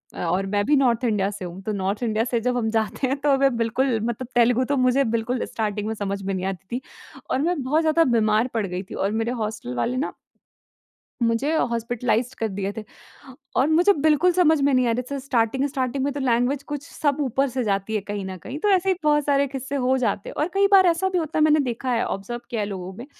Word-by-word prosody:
अ, - - -7
और 180 +3 0
मैं 205 +1 0
भी 295 - +3
नॉर्थ 250 -4 +2
इंडिया 210 -5 +1
से 195 -2 -7
हूँ। 175 +2 -8
तो 215 - -3
नॉर्थ 200 +3 -2
इंडिया 225 -1 +1
से 240 -1 -1
जब 250 +1 0
हम 220 -2 0
जाते 225 +4 0
हैं 270 - -1
तो 280 -2 +3
मैं 270 -2 +2
बिल्कुल 230 +1 +1
मतलब 240 +2 -3
तेलुगु 245 +1 +4
तो - - +1
मुझे 255 +2 +3
बिल्कुल 235 +2 -1
स्टार्टिंग 210 -1 -3
में 220 - -1
समझ 200 -1 -3
में 195 0 -2
नहीं 185 0 -3
आती 195 +5 -4
थी। - - -7 0.5
और 260 - 0
मैं 330 -1 0
बहुत 300 +5 +2
ज़्यादा 320 +1 +3
बीमार 215 +2 +2
पड़ 225 -3 0
गई 180 +1 -4
थी। - - -10
और 195 +1 -1
मेरे 225 +2 -1
हॉस्टल 210 - -5
वाले 240 - -1
ना 280 - -2 1.1
मुझे 230 +7 +1 0.2
हॉस्पिटलाइज़्ड 235 +1 -1
कर 225 - 0
दिए 195 0 -3
थे। 220 - -4 0.7
और 265 - +4
मुझे 350 +6 +5
बिल्कुल 310 +2 +3
समझ 320 -4 +4
में 280 -1 +3
नहीं 255 -1 +3
आ - - +2
रही 245 +2 -1
थी 280 - -2
स्टार्टिंग-स्टार्टिंग 260 +1 0
में 285 - 0
तो 285 - -4
लैंग्वेज़ 255 +2 +1
कुछ 290 -1 -4
सब 290 -2 0
ऊपर 270 +1 0
से 255 0 -2
जाती 200 0 -1
है 210 - 0
कहीं 205 0 -5
न 190 -1 -6
कहीं 270 +4 -6
तो 415 - +1
ऐसे 375 +1 0
ही 375 - +3
बहुत 295 -1 +3
सारे 280 -1 +2
किस्से 270 +1 -5
हो 260 +1 +3
जाते 205 -5 -1
हैं। - - -8
और 315 - 0
कई 395 0 +4
बार 380 -1 +7
ऐसा 345 +3 +2
भी 370 - -1
होता 315 -2 -1
है - - +5
मैंने 305 0 +5
देखा 255 -1 -2
है 235 - +1
ऑब्ज़र्व 235 +5 -4
किया 225 -3 -2
है 205 - -2
लोगों 190 -2 -6
में 240 - -8
245 Hz, 245 wpm, -23 LUFS, 215-280 Hz, 1.1 s, बार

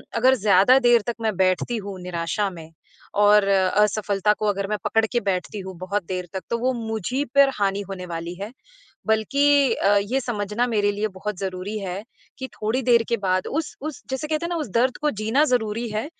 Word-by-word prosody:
अगर 255 +3 +4
ज़्यादा 205 +3 +5
देर 240 -2 +4
तक 235 - -1
मैं 215 -3 0
बैठती 190 +5 +1
हूँ 195 -2 -6
निराशा 180 +3 -2
में 165 -3 -11 0.5
और 205 -1 +5
असफलता 200 +1 +2
को 215 - 0
अगर 200 -1 -1
मैं 210 - 0
पकड़ 225 0 +2
के 240 - +3
बैठती 195 +1 -2
हूँ 190 -1 -7
बहुत 190 +1 -2
देर 180 0 -4
तक, 190 - -3
तो 235 - 0
वो 255 +2 +1
मुझ 220 -1 -3
ही 275 +2 +1
पर 280 -1 +7
हानि 200 0 +1
होने 185 -2 -6
वाली 170 +1 -5
है। 210 +3 -5 0.6
बल्कि 275 +4 +3
अ, 205 +1 +3
ये 205 +7 0
समझना 230 0 -2
मेरे 205 -3 +1
लिए 210 +2 -1
बहुत 210 -1 -4
ज़रूरी 190 +2 -4
है 195 +1 -5 0.4
कि 260 - -4
थोड़ी 220 +5 -1
देर 235 -2 +4
के 235 - +1
बाद 185 0 +1
उस 315 +1 -3
उस 305 -2 -6
जैसे 265 +3 -3
कहते 310 +2 -1
हैं - - -3
ना, 350 - -2
उस 305 -9 -3
दर्द 255 +2 +2
को 300 - +2
जीना 225 +7 +2
ज़रूरी 235 -3 0
है, 215 +1 -2
210 Hz, 210 wpm, -23 LUFS, 195-240 Hz, 0.6 s, पर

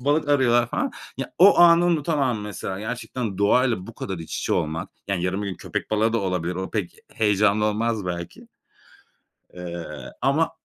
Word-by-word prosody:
balık 145 +3 +1
arıyorlar 120 -4 +3
falan. - - -1 0.2
Ya, - - -5
o 195 +3 +7
anı 170 0 +7
unutamam 145 -8 +1
mesela. 95 -2 -5
Gerçekten 115 -2 -4
doğayla 110 -1 +2
bu 115 - -10
kadar 95 -2 -5
iç 80 - -6
içe - - -1
olmak. 80 +1 -1 0.2
Yani, 90 -3 -1
yarın 95 +3 -1
bir 100 - -3
gün 95 - -4
köpek - - -5
balığı 110 +1 +2
da 115 - +2
olabilir. 90 -2 -2
O 95 +1 -4
pek 100 -6 -3 0.2
heyecanlı 105 0 +2
olmaz 110 -1 0
belki. 85 -1 -6 1.1
Eee, 85 -1 -6 0.3
ama 155 +4 +2
105 Hz, 170 wpm, -24 LUFS, 95-125 Hz, 1.1 s, o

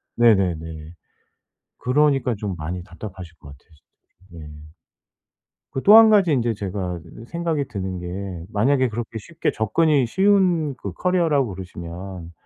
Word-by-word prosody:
네네네. 85 -8 +1 0.9
그러니까 135 -1 +2
좀 100 -2 -4
많이 85 +3 -5
답답하실 90 -2 -10
것 70 - -14
같아요, 70 +4 -16 0.6
진짜로. 85 -2 -10
예. 75 +1 -13 1.0
그 135 - -3
또 210 +2 +8
1 225 0 +9
가지 195 -6 +4
인제 120 -4 +1
제가 95 -3 -4 0.2
이 115 - -10
생각이 165 -3 -2
드는 95 -3 -4
게 90 -1 -6
만약에 130 +5 +2
그렇게 115 0 -5
쉽게 165 +10 -3
접근이 135 +5 +2
쉬운 185 - +2
그 - - -6
커리어라고 160 - +1
그러시면 90 -1 -8
105 Hz, 290 characters per minute, -22 LUFS, 90-145 Hz, 1.0 s, 1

